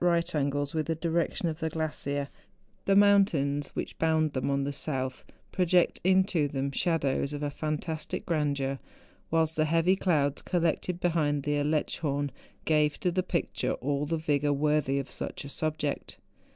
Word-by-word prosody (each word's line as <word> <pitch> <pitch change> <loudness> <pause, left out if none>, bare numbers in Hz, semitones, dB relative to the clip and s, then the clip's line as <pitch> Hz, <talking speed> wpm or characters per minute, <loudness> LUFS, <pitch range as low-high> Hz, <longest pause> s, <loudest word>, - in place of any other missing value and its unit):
right 170 -1 +2
angles 145 -1 0
with 155 -2 -1
the 165 - 0
direction 170 +1 0
of 160 -1 -3
the 160 - -1
glacier, 145 -3 -2 0.6
the 195 - +3
mountains 185 -9 +4
which - - -5
bound 160 -2 +2
them 130 +1 -1
on 140 0 +1
the 140 +1 -2
south 130 -3 -3 0.3
project 180 -1 +2
into 185 -4 +3
them 140 0 -2
shadows 140 -3 0
of 145 0 -4
a 145 - -1
fantastic 155 +1 -3
grandeur, 140 -4 0 0.5
whilst 160 -1 +2
the 155 - +2
heavy 165 +4 +3
clouds 150 -7 +1
collected 175 0 0
behind 155 -5 +1
the 145 0 0
Aletschhorn, 145 -1 0 0.3
gave 150 -1 +2
to 180 - +1
the 185 +2 +1
picture 180 -2 -1
all 140 +2 -1
the 165 +2 0
vigour 145 -2 +1
worthy 145 -1 +1
of 140 -1 -2
such - - -5
a - - -7
subject. 155 -1 -3
155 Hz, 160 wpm, -29 LUFS, 140-165 Hz, 0.6 s, mountains